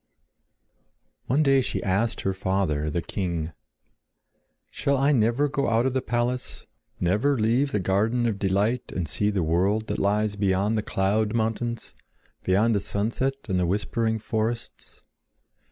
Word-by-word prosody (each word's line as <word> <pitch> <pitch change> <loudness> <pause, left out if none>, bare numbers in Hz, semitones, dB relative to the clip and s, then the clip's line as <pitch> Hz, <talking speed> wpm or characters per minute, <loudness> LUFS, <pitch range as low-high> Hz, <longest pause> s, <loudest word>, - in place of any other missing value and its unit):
One 140 +5 +3
day 135 -2 +4
she - - -3
asked 100 +4 0
her 95 - 0
father, 95 -6 -1
the 85 +2 -2
king: 85 -4 -3 1.2
"Shall 140 0 0
I 140 +2 +3
never 120 +3 +2
go 140 0 -1
out 115 +2 +2
of 130 - 0
the 130 - 0
palace, 120 +1 -2 0.3
never 105 +11 +2
leave 120 +6 +2
the 105 - 0
garden 105 +6 +1
of 110 -4 -1
delight 105 +5 0
and 90 -3 -3
see 105 +6 +1
the 100 -4 0
world 95 +7 +1
that - - -3
lies 105 +1 +1
beyond 100 +1 +1
the 110 - +1
cloud 105 +2 0
mountains, 115 +1 -2 0.5
beyond 105 +5 +2
the 100 - +2
sunset 115 +7 -1
and 95 -3 0
the 90 - +1
whispering 110 +4 0
forests?" 110 +1 -4
110 Hz, 150 wpm, -25 LUFS, 95-120 Hz, 1.2 s, day